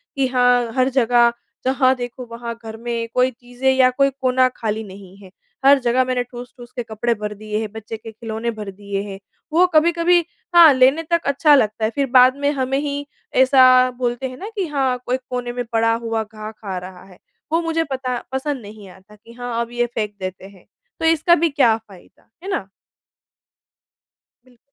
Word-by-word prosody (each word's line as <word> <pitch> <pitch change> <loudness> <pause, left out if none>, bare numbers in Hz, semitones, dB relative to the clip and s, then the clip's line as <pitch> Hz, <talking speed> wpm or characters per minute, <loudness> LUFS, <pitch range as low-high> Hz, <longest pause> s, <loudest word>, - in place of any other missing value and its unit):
कि 270 -1 +1
हाँ, 245 -2 +2
हर 255 +1 +3
जगह 240 0 +4 0.3
जहाँ 260 0 +3
देखो 245 0 -7
वहाँ 235 0 -5
घर 220 0 -7
में 230 0 -3
कोई 255 +1 +2
चीज़ें 245 +2 -2
या 260 -1 +5
कोई 275 +2 +2
कोना 255 0 +3
खाली 220 0 -3
नहीं 190 -1 -13
है। 195 -2 -15 0.3
हर 280 0 +7
जगह 250 0 +2
मैंने 250 -1 -1
ठूस-ठूस 245 0 -11
के 245 - -3
कपड़े 225 +1 -1
भर 210 -1 -5
दिए 215 +1 -4
हैं, 220 -2 -4
बच्चे 220 +1 -7
के 225 +1 -10
खिलौने 225 +1 -4
भर 210 -3 -7
दिए 200 0 -5
हैं। 195 0 -8 0.3
वो 350 +3 +5
कभी-कभी 340 +2 +4 0.4
हाँ, 335 -4 +9
लेने 265 +5 +4
तक 340 0 +3
अच्छा 290 +2 +4
लगता 215 -4 +1
है - - +1
फिर 280 - +1
बाद 255 0 +7
में 285 0 +1
हमें 270 -1 -1
ही 285 0 -3 0.4
ऐसा 255 -1 +6
बोलते 245 +1 -2
हैं 255 - -10
ना 405 - -7
कि 390 -4 -2
हाँ, 270 -4 0
कोई 250 +1 0
कोने 250 -1 -3
में 245 0 -3
पड़ा 230 0 +2
हुआ 225 -1 -2
घा 215 0 -9
खा 200 -4 -7
रहा 180 0 -9
है। 190 -2 -17 0.3
वो 330 +1 +2
मुझे 330 -1 0
पता 255 -2 -2
पसंद 265 0 -3
नहीं 205 -2 -12
आता 190 +3 -17
कि 230 +2 -17
हाँ, 245 -1 -4
अब 235 0 -5
ये 240 0 0
फेंक 210 -2 -3
देते 185 0 -6
हैं। 195 -2 -19 0.3
तो - - -2
इसका 330 +1 +4
भी 335 0 +1
क्या 265 -6 +3
फ़ायदा, 205 -5 -19
है 390 - -6
ना। 200 - -2 1.8
बिल 250 -1 -24
245 Hz, 195 wpm, -20 LUFS, 220-265 Hz, 1.8 s, हाँ